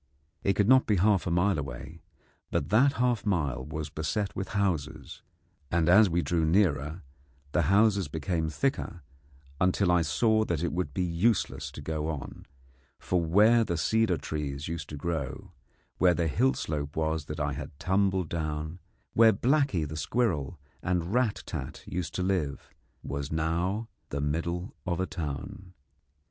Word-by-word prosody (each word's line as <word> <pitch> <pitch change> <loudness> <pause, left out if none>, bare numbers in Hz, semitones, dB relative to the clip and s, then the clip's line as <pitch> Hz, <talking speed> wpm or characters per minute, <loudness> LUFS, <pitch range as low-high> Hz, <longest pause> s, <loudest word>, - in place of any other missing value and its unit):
It 100 - +3
could 100 0 +2
not 130 +1 +6
be 105 - +3
half 100 0 +3
a - - +1
mile 90 +1 +2
away, 70 +3 -7 0.5
but 70 - -1
that 130 +7 +5
half 125 -3 +1
mile 75 - 0
was 75 +1 -5
beset 95 +7 -2
with 95 - -3
houses, 80 -7 -2 0.5
and 85 -1 +1
as 100 +3 +7
we 85 0 +1
drew 85 -2 +1
nearer 80 -2 +1 0.5
the 90 - +2
houses 100 -2 +4
became 80 +2 -2
thicker, 90 - -2 0.6
until 90 0 +3
I 90 -1 +4
saw 110 +8 +2
that 85 -4 -1
it 85 - -1
would 90 -5 -2
be 90 +6 -1
useless 85 - 0
to 75 - -8
go 80 0 -2
on, 70 -5 -6 0.5
for 90 -2 0
where 105 +8 +5
the 85 -6 -2
cedar 110 +1 +2
trees 75 -1 -4
used 80 -2 -5
to 75 - -6
grow, 70 -4 -4 0.5
where 90 -1 +5
the 85 -1 0
hill 130 - +2
slope 75 -2 -3
was 80 -1 -1
that 75 +1 -6
I 70 -1 0
had 70 +1 -7
tumbled 95 -2 +1
down, 80 +1 -3 0.3
where 115 0 +7
Blacky 125 - +1
the 80 +2 -6
squirrel 80 - 0 0.2
and 90 +1 -1
Rat 125 -4 +1
tat - - -6
used 80 -3 -4
to 90 - -1
live, 90 -7 -2 0.3
was 70 0 -4
now 85 +7 -1 0.2
the 70 - -3
middle 85 - -2
of 90 -2 -2
a 95 - +1
town. 85 +3 -6
85 Hz, 160 wpm, -29 LUFS, 75-100 Hz, 0.6 s, as